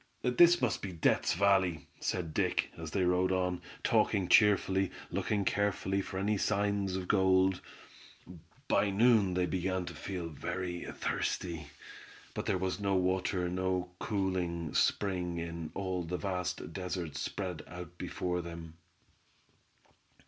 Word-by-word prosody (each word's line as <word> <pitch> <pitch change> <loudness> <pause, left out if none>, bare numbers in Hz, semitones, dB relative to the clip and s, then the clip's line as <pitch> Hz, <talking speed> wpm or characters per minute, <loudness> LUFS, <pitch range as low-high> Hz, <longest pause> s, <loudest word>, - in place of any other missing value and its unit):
"This 165 +6 +5
must 120 - +1
be 95 - -4
Death's 85 -1 +2
Valley," 95 -5 +2
said 85 -4 -2
Dick, - - +1
as 80 -1 -6
they 95 +4 0
rode 90 +1 +2
on, 90 -1 0 0.2
talking 95 -3 +2
cheerfully, 95 -2 +4 0.2
looking 105 -2 0
carefully 100 -1 0
for 95 - -6
any 100 +1 +1
signs 100 -2 0
of 95 -1 -3
gold. 95 -2 +3 1.1
By 100 - +3
noon 105 -2 +4
they 90 0 +2
began 95 +1 -1
to 85 - -6
feel 85 +2 -5
very 90 +3 -4
thirsty, 85 -4 -2 0.7
but - - -4
there - - +2
was 95 +2 -2
no 100 -1 +1
water, 90 0 +1
no 90 0 -1
cooling 90 -6 -1
spring 90 -4 +1
in 85 -1 -4
all 95 -2 -2
the 85 +1 -3
vast 90 -5 -3
desert 90 -5 -4
spread 90 +2 -3
out 90 -1 -9
before 90 -1 -2
them. 85 -1 -9
95 Hz, 135 wpm, -32 LUFS, 90-100 Hz, 1.1 s, This